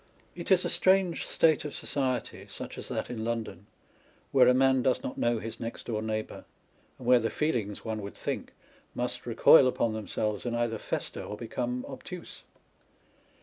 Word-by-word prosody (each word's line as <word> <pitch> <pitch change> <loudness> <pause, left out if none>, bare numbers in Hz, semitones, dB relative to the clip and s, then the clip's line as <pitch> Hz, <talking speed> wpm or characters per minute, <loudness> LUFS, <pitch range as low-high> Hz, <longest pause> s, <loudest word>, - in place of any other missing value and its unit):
It 170 -1 -7
is 185 -2 +5
a - - 0
strange 190 -2 +3
state 160 -3 +3
of 150 - -6
society 130 -4 -2
(such - - -6
as - - -7
that - - -3
in 110 -3 -4
London) 115 -4 -4 0.6
where 130 -2 +6
a 125 - +7
man 130 0 +4
does 130 0 +1
not - - -4
know 120 0 +1
his 115 +1 -6
next 115 0 -6
door 110 -3 -2
neighbour, 110 0 -4 0.5
and 125 - -11
where 125 0 +6
the 115 0 0
feelings 115 -11 -2
(one 110 -1 -3
would 100 0 -7
think) - - -4 0.4
must - - -3
recoil 130 - +7
upon 115 -3 0
themselves, 105 -1 -2
and 120 -1 -2
either 120 -2 -1
fester - - -4
or 105 - -6
become 125 +2 -3
obtuse. - - -8
120 Hz, 175 wpm, -29 LUFS, 110-130 Hz, 0.6 s, a